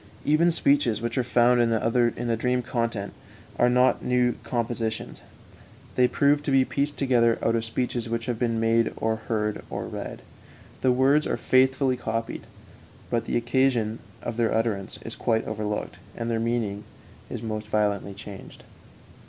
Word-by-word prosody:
Even 155 Hz, +4 st, +4 dB
speeches 140 Hz, -9 st, +2 dB
which 115 Hz, 0 st, -3 dB
are 130 Hz, -, +1 dB
found 120 Hz, 0 st, +4 dB
in 120 Hz, -, +3 dB
the 115 Hz, +1 st, +1 dB
dream 125 Hz, +2 st, 0 dB
content 115 Hz, -5 st, -2 dB, 0.5 s
are 120 Hz, -, +5 dB
not 125 Hz, +1 st, +3 dB
new 125 Hz, -1 st, +2 dB
compositions; 115 Hz, -1 st, -3 dB, 0.7 s
they 125 Hz, -1 st, +4 dB
prove 145 Hz, +3 st, +2 dB
to -, -, -4 dB
be 135 Hz, -1 st, +4 dB
pieced 140 Hz, +3 st, -1 dB
together 120 Hz, -4 st, +3 dB
out 115 Hz, -, +2 dB
of 115 Hz, -, 0 dB
speeches 120 Hz, 0 st, -2 dB
which 115 Hz, 0 st, -2 dB
have 120 Hz, -3 st, -3 dB
been 115 Hz, -2 st, 0 dB
made 115 Hz, +1 st, +2 dB
or 110 Hz, 0 st, 0 dB
heard 105 Hz, -1 st, -2 dB
or -, -, -4 dB
read; -, -, -7 dB, 0.6 s
the 130 Hz, -, +4 dB
words 135 Hz, +4 st, +3 dB
are -, -, -1 dB
faithfully 130 Hz, 0 st, +3 dB
copied, 115 Hz, -1 st, -4 dB, 0.6 s
but 115 Hz, -, 0 dB
the -, -, 0 dB
occasion 120 Hz, -2 st, +1 dB, 0.2 s
of 120 Hz, -1 st, -4 dB
their 115 Hz, -2 st, +2 dB
utterance 110 Hz, -4 st, -1 dB
is 115 Hz, -, -5 dB
quite 110 Hz, -2 st, 0 dB
overlooked, 105 Hz, -1 st, -3 dB, 0.2 s
and 115 Hz, 0 st, -2 dB
their 115 Hz, -, 0 dB
meaning 115 Hz, -3 st, -1 dB, 0.5 s
is -, -, -6 dB
most 110 Hz, -1 st, -4 dB
violently 105 Hz, -2 st, 0 dB
changed. 100 Hz, -1 st, -10 dB
115 Hz, 160 wpm, -26 LUFS, 110-125 Hz, 0.7 s, are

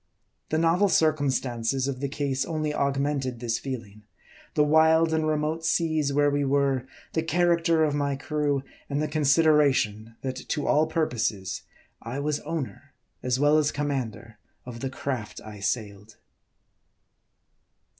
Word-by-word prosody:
The 155 Hz, -, +1 dB
novel 170 Hz, +5 st, +3 dB
circumstances 135 Hz, -6 st, +1 dB
of 135 Hz, -2 st, -3 dB
the 140 Hz, 0 st, -2 dB
case 140 Hz, -2 st, -1 dB
only 155 Hz, -2 st, -2 dB
augmented 140 Hz, -3 st, -1 dB
this 115 Hz, -1 st, -1 dB
feeling; 115 Hz, -6 st, -7 dB, 0.5 s
the 150 Hz, -, +4 dB
wild 160 Hz, +2 st, +4 dB
and 160 Hz, -1 st, +1 dB
remote 155 Hz, +1 st, -1 dB
seas 160 Hz, -3 st, +1 dB
where 145 Hz, +1 st, +3 dB
we 145 Hz, 0 st, +1 dB
were; 135 Hz, -2 st, +1 dB, 0.3 s
the 160 Hz, -, +1 dB
character 170 Hz, 0 st, +2 dB
of 150 Hz, -2 st, +1 dB
my 140 Hz, -1 st, 0 dB
crew, 145 Hz, -1 st, -1 dB, 0.3 s
and 140 Hz, 0 st, -1 dB
the 155 Hz, -, 0 dB
consideration, 140 Hz, -7 st, +2 dB
that 130 Hz, -1 st, -3 dB
to 145 Hz, +3 st, -3 dB
all 155 Hz, +1 st, +3 dB
purposes, 115 Hz, -, -1 dB, 0.4 s
I 120 Hz, +4 st, -5 dB
was 145 Hz, +1 st, -1 dB
owner, 145 Hz, -2 st, -6 dB, 0.3 s
as 125 Hz, 0 st, 0 dB
well 145 Hz, +2 st, +5 dB
as 150 Hz, -1 st, +1 dB
commander 120 Hz, -6 st, -4 dB, 0.3 s
of 120 Hz, -2 st, -8 dB
the 135 Hz, -, -3 dB
craft 130 Hz, -4 st, -4 dB
I 105 Hz, -1 st, -9 dB
sailed. 105 Hz, 0 st, -3 dB
140 Hz, 140 wpm, -26 LUFS, 125-155 Hz, 0.5 s, well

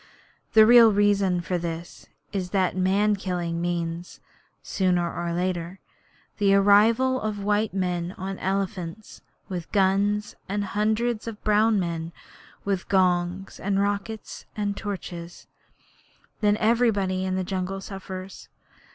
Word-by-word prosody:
The 220 Hz, -1 st, +8 dB
real 235 Hz, -1 st, +8 dB
reason 200 Hz, -3 st, +2 dB
for 180 Hz, +1 st, -2 dB
this 170 Hz, 0 st, -6 dB, 0.3 s
is 185 Hz, -3 st, -2 dB
that 185 Hz, -1 st, +1 dB
man 195 Hz, +3 st, +2 dB
killing 175 Hz, -3 st, -3 dB
means, 170 Hz, 0 st, -3 dB, 0.4 s
sooner 180 Hz, -3 st, 0 dB
or 170 Hz, 0 st, -3 dB
later, 175 Hz, +1 st, -2 dB, 0.6 s
the 200 Hz, -1 st, +4 dB
arrival 225 Hz, +6 st, +4 dB
of 210 Hz, -2 st, -3 dB
white 210 Hz, 0 st, 0 dB
men 180 Hz, -2 st, -2 dB
on 190 Hz, +1 st, -5 dB
elephants, 190 Hz, 0 st, -3 dB, 0.3 s
with 175 Hz, -3 st, -6 dB
guns, 205 Hz, +1 st, +1 dB
and 205 Hz, +1 st, -1 dB
hundreds 215 Hz, +3 st, 0 dB
of 220 Hz, -2 st, -7 dB
brown 215 Hz, 0 st, +3 dB
men 165 Hz, -2 st, -3 dB, 0.5 s
with 195 Hz, -2 st, -2 dB
gongs 185 Hz, 0 st, +1 dB
and 195 Hz, 0 st, 0 dB
rockets 205 Hz, +2 st, -3 dB
and 205 Hz, -1 st, -1 dB
torches. 175 Hz, -5 st, -7 dB, 0.9 s
Then 210 Hz, 0 st, +3 dB
everybody 215 Hz, -5 st, +2 dB
in 185 Hz, 0 st, -1 dB
the 185 Hz, -, -1 dB
jungle 190 Hz, +1 st, -3 dB
suffers. 190 Hz, -1 st, -8 dB
195 Hz, 125 wpm, -25 LUFS, 180-205 Hz, 0.9 s, The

